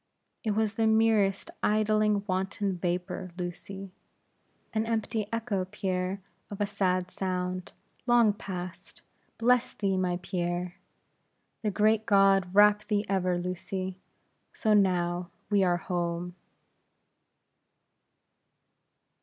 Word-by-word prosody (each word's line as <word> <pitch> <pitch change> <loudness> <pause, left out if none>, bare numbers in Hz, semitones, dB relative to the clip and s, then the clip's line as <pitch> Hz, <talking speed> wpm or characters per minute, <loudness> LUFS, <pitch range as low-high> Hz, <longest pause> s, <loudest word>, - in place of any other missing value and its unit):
"It 215 -3 0
was 220 -1 +1
the 225 -1 +1
merest, 220 -3 +3
idling, 215 -1 +2
wanton 190 0 -1
vapor, 180 +1 -3
Lucy!" 190 +2 -6 0.8
"An 220 0 0
empty 220 -1 -1
echo, 225 -5 -1
Pierre, 185 0 -2 0.3
of 205 - -7
a 205 - +2
sad 185 -3 0
sound, 185 -1 -3 0.4
long 240 -3 +5
past. 185 -3 -8 0.3
Bless 250 +1 +3
thee, 195 -2 0
my 180 -1 0
Pierre!" 175 -1 -2 0.9
"The 215 - 0
great 215 +2 +2
God 195 -3 +4
wrap 210 +1 +6
thee 210 -1 0
ever, 185 -2 +1
Lucy. 185 +1 -4 0.5
So, 215 -2 +1
now, 180 -3 +2 0.2
we 200 -2 +4
are 175 -1 +3
home." 175 -1 -3
195 Hz, 105 wpm, -29 LUFS, 180-210 Hz, 0.9 s, wrap